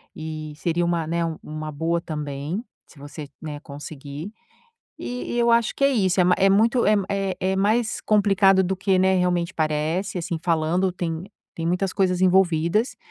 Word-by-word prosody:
E 155 -1 -6
seria 170 +2 0
uma, 170 -2 0
né, 170 +1 -1 0.2
uma 155 0 -6
boa 165 +3 -1
também, 150 - -4 0.2
se 145 - -18
você, 145 +1 -8
né, 150 -2 -6
conseguir. 145 +4 -8 0.7
E 245 -1 -5
e - - -1
eu 235 0 +3
acho 235 -1 +3
que 275 - 0
é - - +6
isso. 190 -6 +2
É - - +5
ma 180 - +4
é 195 - +5
muito 230 +5 +3
é 210 - +5
m 200 -2 +2
é 195 -2 -1
é 190 +1 0
mais 215 +3 +1
complicado 195 -2 +4
do 190 +1 -1
que, 190 0 +1
né, 190 0 +3
realmente 180 -1 0
parece. 160 +5 -1
Assim, 170 -1 -3
falando, 170 +2 +1
tem 170 -1 -4 0.3
tem 165 0 -4
muitas 180 +2 0
coisas 185 -2 +1
envolvidas, 185 +3 +2
180 Hz, 185 wpm, -23 LUFS, 160-195 Hz, 0.7 s, é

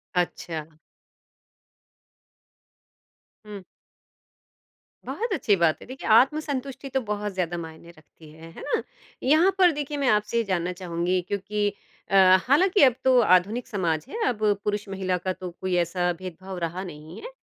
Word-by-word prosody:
अच्छा। 160 -3 -3 2.7
हुँ। 205 -2 -9 1.4
बहुत 455 -1 -3
अच्छी 210 - +2
बात 170 -4 +2
है - - -10
देखिए, 260 +2 -8
आत्मसंतुष्टि 275 +2 +2
तो 265 0 -1
बहुत 210 -2 -3
ज़्यादा 175 -2 -2
मायने 165 0 -9
रखती 155 0 -18
है 165 +1 -13
है - - -11
ना। - - +2 0.4
यहाँ 315 +8 +4
पर 365 -2 +6
देखिए 295 -1 -4
मैं 280 -2 0
आपसे 210 +2 +1
ये 230 - +2
जानना 180 -3 -1
चाहूँगी 180 0 -1
क्योंकि 205 +1 -1 0.4
अ, 195 - +1 0.3
हालाँकि 360 +8 +4
अब 260 -3 +6
तो 260 -1 +5
आधुनिक 205 +4 +2
समाज 170 -7 -1
है, - - -6
अब 225 - -1 0.2
पुरुष-महिला 195 -3 -2
का 185 - +2
तो 185 0 -7
कोई 185 -1 -1
ऐसा 175 +1 0
भेदभाव 185 +1 -8
रहा 175 +2 -3
नहीं 155 -2 -10
है। - - -8
195 Hz, 145 wpm, -25 LUFS, 175-255 Hz, 2.7 s, पर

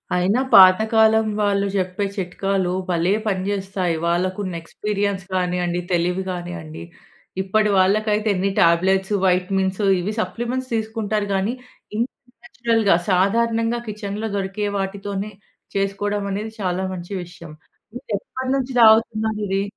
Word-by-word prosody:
అయినా 195 +8 +2
పాత 185 +1 +9
కాలం 220 0 +4
వాళ్ళు 200 -1 +1
చెప్పే 185 +2 -1
చిట్కాలు 190 0 -1 0.2
భలే 175 +2 +1
పనిచేస్తాయి. 190 -3 -1
వాళ్ళకున్న 185 +2 -1
ఎక్స్పీరియన్స్ 200 +1 -2
గానియ్యండి, 180 -1 0
తెలివి 180 +2 0
గానియ్యండి, 175 -3 -6 0.6
ఇప్పటి 210 +2 +1
వాళ్ళకైతే 210 +3 +2
ఎన్ని 195 +2 0
టాబ్లెట్సు, 190 +4 +3
వైటమిన్సు 190 +2 +1
ఇవి 205 +5 -3
సప్లిమెంట్స్ 240 +7 -4
తీసుకుంటారు 215 -2 -2
గాని, 195 +5 0 0.4
ఇంత 235 +4 0 0.3
నేచురల్‌గా 230 - +1
సాధారణంగా 230 +5 +2
కిచెన్‌లో 210 +1 -4
దొరికే 195 +2 -2
వాటితోనే 200 +1 -4 0.4
చేసుకోవడం 200 +1 -1
అనేది 215 +3 -4
చాలా 185 0 -1
మంచి 175 +2 -7
విషయం. 170 -2 -12 0.4
మీరు 245 - -10
ఎప్పటినుంచి 260 +1 -3
తాగుతున్నారు 220 -1 +4
ఇది? 195 +1 0
195 Hz, 110 wpm, -21 LUFS, 185-215 Hz, 0.6 s, పాత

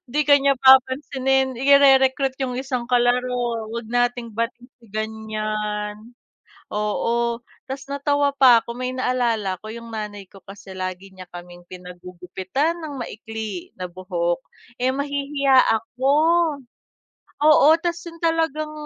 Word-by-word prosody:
'di 300 +3 +1
ka 285 -1 +5
niya 275 0 +2
papansinin, 265 0 +3
ire-recruit 270 -1 +4
yung 255 -2 -2
isang 255 -2 -3
kalaro, 245 -2 0
"'Wag 235 -1 -5
nating 245 -1 0
bati 230 +2 -3 0.2
si 230 - -19
ganyan," 215 +1 -4 0.5
oo. 235 +3 -1 0.2
Tas 270 +1 -8
natawa 285 0 +1
pa 250 -4 +7
'ko 235 0 -8
may 255 0 -3
naalala 235 -7 -1
'ko, 215 - -7
yung 230 0 -9
nanay 205 -3 -6
ko 195 0 -17
kasi 195 -1 -12
lagi 185 +1 -5
niya 185 - -9
kaming 175 0 -11
pinagugupitan 180 - -4
ng 295 -5 -7
maikli 220 -4 -7
na 180 -1 -6
buhok, 175 -1 -2 0.4
eh 255 +1 +1
mahihiya 280 -1 0 0.2
ako. 260 +5 -1 1.3
Oo, 305 -1 +6
tas 345 0 -2
yun 335 - -12
talagang 320 -2 0
245 Hz, 125 wpm, -22 LUFS, 210-270 Hz, 1.3 s, pa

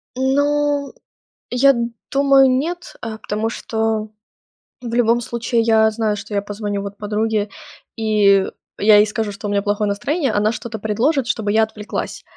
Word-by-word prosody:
Ну, 285 +2 +1 0.6
я 275 +3 +4 0.4
думаю, 275 -1 +5
нет, 330 +8 -2
э, 220 -2 -5
потому 215 +1 -3
что 220 -2 -2 0.7
в 235 -1 -6
любом 235 0 +3
случае 235 0 -1
я 220 -1 +4
знаю, 215 -1 -1
что 205 +1 -8
я 200 - +1
позвоню, 205 0 -4
вот, 200 0 -7
подруге, 210 0 -1 0.5
и 205 -3 +3 0.3
я 210 0 +6
ей 210 - +6
скажу, 215 0 -3
что 205 +1 -7
у - - -3
меня 200 0 +1
плохое 205 +1 0
настроение, 270 - -1
она 210 +1 +1
что-то 230 0 -6
предложит, 240 +6 0
чтобы 220 -3 -1
я 220 +1 +4
отвлеклась 215 -1 -5
220 Hz, 155 wpm, -19 LUFS, 210-245 Hz, 0.7 s, я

